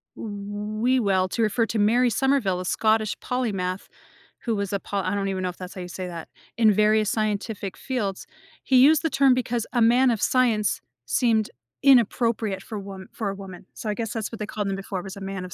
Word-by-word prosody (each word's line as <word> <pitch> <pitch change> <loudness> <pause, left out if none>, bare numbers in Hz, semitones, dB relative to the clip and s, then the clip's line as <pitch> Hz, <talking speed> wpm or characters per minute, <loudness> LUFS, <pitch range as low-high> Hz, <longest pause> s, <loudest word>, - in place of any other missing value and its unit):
W 210 +1 -5 0.2
Whewell 190 -3 +1
to - - -1
refer 225 +1 +2
to 220 - -2
Mary 240 +4 +4
Summerville, 240 -7 +1
a - - -6
Scottish 215 +2 +1
polymath, 195 -7 -2 0.5
who 230 -2 -2
was 200 -1 -2
a 200 - -1
pol" 200 0 -3
I 185 +2 0
don't 200 -1 -1
even 190 -1 -2
know 180 - 0
if 175 - -9
that's 185 0 -8
how 185 - -6
you 180 - -6
say 180 +1 -6
that, 170 -2 -8 0.3
"...in 220 -2 +5
various 215 +1 +3
scientific 210 -2 -2
fields. 210 -8 -3 0.4
He 260 - +3
used 290 +4 +6
the 325 - +1
term 270 -1 +4
because 240 -2 -1
'a 240 - +2
man 245 +3 +5
of 220 - -2
science' 230 -5 +2 0.2
seemed 220 - +2 0.3
inappropriate 230 -6 +3
for 215 - -6
wom 195 -1 -9
for 215 -3 -3
a 195 - -4
woman," 190 -2 -10
so, 220 - -5
I - - +1
guess 225 -2 -3
that's 225 -3 -3
what 230 - -8
they 210 - -2
called 210 -2 -3
them 195 - -1
before 195 -1 -5
was 195 +2 -8
a 200 - -9
man 195 -1 -5
of 180 - -9
210 Hz, 220 wpm, -24 LUFS, 195-230 Hz, 0.5 s, used